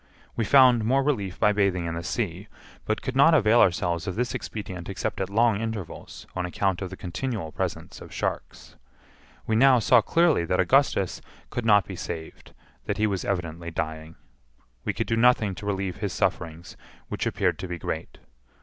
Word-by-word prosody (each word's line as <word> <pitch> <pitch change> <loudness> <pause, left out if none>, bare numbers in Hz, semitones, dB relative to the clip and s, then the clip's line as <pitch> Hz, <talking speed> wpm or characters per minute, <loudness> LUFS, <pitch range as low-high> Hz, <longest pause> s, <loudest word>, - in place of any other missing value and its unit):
We 115 - 0
found 125 -4 +6
more 135 +5 +2
relief 100 -10 -1
by 105 - +4
bathing 100 -4 +1
in 85 - -3
the 85 - -4
sea, 85 - -3 0.4
but 110 - -2
could 130 - -3
not 155 +4 +6
avail 115 -4 +4
ourselves 85 -2 +1
of 95 - -3
this 125 +2 -1
expedient 95 -5 -6
except 95 - -3
at 95 - -2
long 110 0 +2
intervals, 110 -6 -6
on 90 - -1
account 95 +1 -1
of 95 - -4
the 95 - -9
continual 95 -1 -4
presence - - -5
of - - -11
sharks. - - -5 0.7
We 110 - 0
now 130 +2 +6
saw 120 +1 +5
clearly 165 - +3
that - - 0
Augustus - - +2 0.3
could 120 - -3
not 105 -4 +5
be - - -7
saved; 80 -1 -8 0.3
that - - -2
he 110 - +2
was 100 -3 -1
evidently 85 -3 -3
dying. 80 0 -5 0.7
We - - 0
could - - -2
do 115 - 0
nothing 115 -4 +4
to 100 +3 -8
relieve 95 -2 -2
his - - -3
sufferings, 80 0 -2 0.3
which - - -3
appeared - - 0
to 95 - -5
be 85 0 -4
great. - - -5
100 Hz, 185 wpm, -26 LUFS, 85-115 Hz, 0.7 s, found